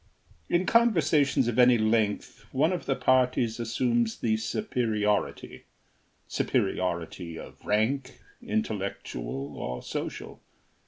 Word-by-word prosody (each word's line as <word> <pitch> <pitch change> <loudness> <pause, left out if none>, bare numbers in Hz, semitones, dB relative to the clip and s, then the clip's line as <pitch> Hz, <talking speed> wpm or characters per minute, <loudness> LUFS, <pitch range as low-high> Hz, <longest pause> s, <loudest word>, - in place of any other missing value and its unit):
In 175 +2 +2
conversations 155 - +3
of 120 +1 0
any 125 -1 +7
length 110 -1 0
one 155 +7 +2
of 180 - -4
the 135 - +2
parties 125 -3 +2
assumes 120 0 0
the 110 -2 +1
superiority 110 - -1 0.6
superiority 85 -1 -1
of - - -11
rank, 130 +6 0 0.2
intellectual 100 - -3
or 60 0 -5
social. - - -6
120 Hz, 100 wpm, -28 LUFS, 105-135 Hz, 0.6 s, any